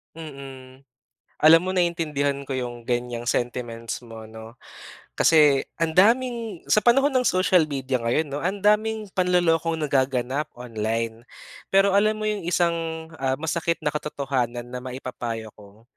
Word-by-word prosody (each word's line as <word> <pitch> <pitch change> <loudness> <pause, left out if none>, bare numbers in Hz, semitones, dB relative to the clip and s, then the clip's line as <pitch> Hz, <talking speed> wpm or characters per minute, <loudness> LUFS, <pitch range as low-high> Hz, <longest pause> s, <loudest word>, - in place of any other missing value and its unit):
Mm, 135 -4 -10 0.6
alam 160 +2 +8
mo 185 - -1
naintindihan 160 -6 0
ko 135 - -8
yung 120 -2 -4
ganyang 120 -1 -2
sentiments 120 -1 -3
mo 110 -1 -10
'no. 110 0 -11 0.6
Kasi 150 -4 +5
ang 165 -1 -1
daming, 230 -1 +2
sa - - +6
panahon 275 +4 +5
ng 255 -1 +1
social 185 -2 +3
media 135 -3 -2
ngayon 120 +7 0
'no, 145 - -3
ang 190 +5 -2
daming 215 0 +2
panlolokong 175 -3 +2
nagaganap 135 -2 0
online. 115 -1 -3 0.5
Pero 195 +1 +5
alam 215 +1 +3
mo 215 - -6
yung 205 -4 -3
isang 165 -2 -1
ah 130 0 0
masakit 160 +3 -2
na 150 - +2
katotohanan 135 -5 -3
na 125 - -5
maipapayo 125 -3 -6
ko, 105 +1 -17
145 Hz, 140 wpm, -24 LUFS, 125-175 Hz, 0.6 s, alam